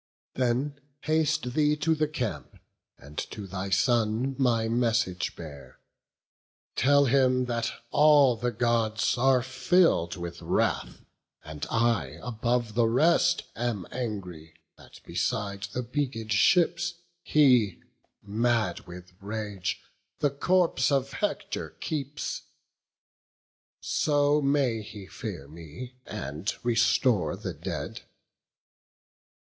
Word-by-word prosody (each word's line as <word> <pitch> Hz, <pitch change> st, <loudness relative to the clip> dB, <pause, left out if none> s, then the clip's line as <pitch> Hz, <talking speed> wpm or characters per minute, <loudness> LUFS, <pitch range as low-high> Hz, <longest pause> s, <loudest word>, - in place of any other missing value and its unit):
Then 130 Hz, +3 st, -1 dB, 0.2 s
haste 155 Hz, -4 st, 0 dB
thee 150 Hz, +1 st, +3 dB
to 150 Hz, +2 st, +1 dB
the 155 Hz, -1 st, +1 dB
camp, 130 Hz, -7 st, -4 dB, 0.4 s
and 70 Hz, +2 st, -8 dB
to 105 Hz, -, -6 dB
thy 95 Hz, +1 st, -5 dB
son 115 Hz, +4 st, +2 dB
My 115 Hz, -4 st, +2 dB
message 115 Hz, -5 st, 0 dB
bear; 70 Hz, -6 st, -11 dB, 1.0 s
tell 140 Hz, +1 st, +4 dB
him 130 Hz, -1 st, +3 dB
that 120 Hz, -1 st, -1 dB, 0.2 s
all 145 Hz, -4 st, +6 dB
the 120 Hz, +2 st, -1 dB
Gods 115 Hz, -1 st, +1 dB
Are 130 Hz, 0 st, +3 dB
fill'd 130 Hz, -, +2 dB
with 85 Hz, -2 st, -7 dB
wrath; -, -, -1 dB, 0.4 s
and 75 Hz, -1 st, -6 dB
I 115 Hz, -, +1 dB
above 120 Hz, -1 st, -1 dB
the 115 Hz, +1 st, +3 dB
rest 170 Hz, +8 st, +3 dB
Am 115 Hz, -6 st, -2 dB
angry, 90 Hz, -10 st, -5 dB, 0.2 s
that -, -, -16 dB
beside 100 Hz, 0 st, -2 dB
the 125 Hz, -, -3 dB
beaked 120 Hz, -4 st, -3 dB
ships, 170 Hz, -, +3 dB, 0.3 s
He, 125 Hz, -, +3 dB, 0.4 s
mad 110 Hz, -3 st, 0 dB
with 90 Hz, +1 st, -11 dB
rage, 105 Hz, -2 st, -4 dB, 0.3 s
the 145 Hz, -, +1 dB
corpse 165 Hz, -2 st, +2 dB
of 135 Hz, -1 st, 0 dB
Hector 205 Hz, -, -3 dB
keeps: 145 Hz, -2 st, -4 dB, 1.4 s
So 145 Hz, 0 st, +2 dB
may 140 Hz, -5 st, +1 dB
he 105 Hz, -2 st, -10 dB
fear 95 Hz, -, -7 dB
me, 85 Hz, -, -10 dB
and 75 Hz, -, -4 dB
restore 115 Hz, -, +2 dB
the -, -, -5 dB
dead. -, -, -5 dB
120 Hz, 110 wpm, -27 LUFS, 100-140 Hz, 1.4 s, all